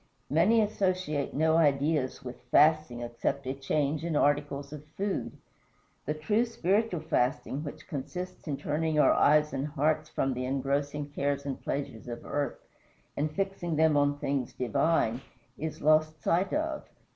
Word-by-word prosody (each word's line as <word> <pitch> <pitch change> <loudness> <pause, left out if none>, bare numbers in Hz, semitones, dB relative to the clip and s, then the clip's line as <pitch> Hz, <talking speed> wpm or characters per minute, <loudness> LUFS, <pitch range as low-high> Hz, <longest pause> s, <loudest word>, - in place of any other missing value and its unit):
Many 190 +10 +4
associate 185 -8 -1
no 160 +2 +3
ideas 145 -3 +1
with 125 0 -8
"fasting" 155 -6 +4
except 120 +3 -2
a 130 - -2
change 145 +2 -1
in 170 -2 -2
articles 145 -1 +1
of 150 -1 -8
food. 200 0 -2 0.7
The 150 - 0
true 210 +10 +1
spiritual 205 -4 0
fasting, 145 -1 0
which 150 0 -8
consists 180 +4 -6
in 140 -2 -2
turning 155 +2 -1
our - - +6
eyes 150 0 +4
and 135 +1 -2
hearts 155 +1 0
from 135 0 0
the 125 +1 -3
engrossing 140 +2 -1
cares 140 0 -1
and 135 -2 -4
pleasures 135 -5 -4
of 120 -1 -7
earth 145 -1 -2 0.6
and 150 +2 0
fixing 175 -1 -2
them 160 0 +4
on 145 0 +2
things 135 -3 -2
divine, 130 -2 +1 0.3
is 155 -1 -5
lost 155 0 +3
sight 180 +4 +2
of. 310 0 -1
150 Hz, 150 wpm, -29 LUFS, 140-160 Hz, 0.7 s, our